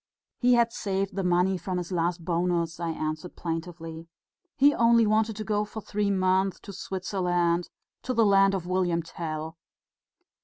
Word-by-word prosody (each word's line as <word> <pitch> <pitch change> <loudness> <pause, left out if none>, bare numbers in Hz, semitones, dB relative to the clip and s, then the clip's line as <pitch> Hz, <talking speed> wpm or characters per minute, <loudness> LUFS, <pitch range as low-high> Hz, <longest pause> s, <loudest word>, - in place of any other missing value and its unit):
"He 245 0 +4
had 235 -1 +3
saved 195 -1 -2
the 195 - -1
money 180 +1 +2
from 185 0 -3
his 180 +1 -4
last 170 -1 -1
bonus," 170 -1 0
I 170 -1 -2
answered 155 +2 -4
plaintively. 165 -1 -5 0.5
"He 285 +1 +6
only 230 -2 +4
wanted 215 +1 +2
to 215 - -4
go 210 0 0
for 210 +1 -7
three 210 -1 -1
months 190 0 +1
to 200 - -9
Switzerland... 180 -3 -1 0.3
to 255 - -3
the 225 -1 +4
land 195 -1 +5
of 180 -3 -4
William 180 -2 0
Tell." 160 -1 -6
185 Hz, 160 wpm, -27 LUFS, 170-205 Hz, 0.5 s, He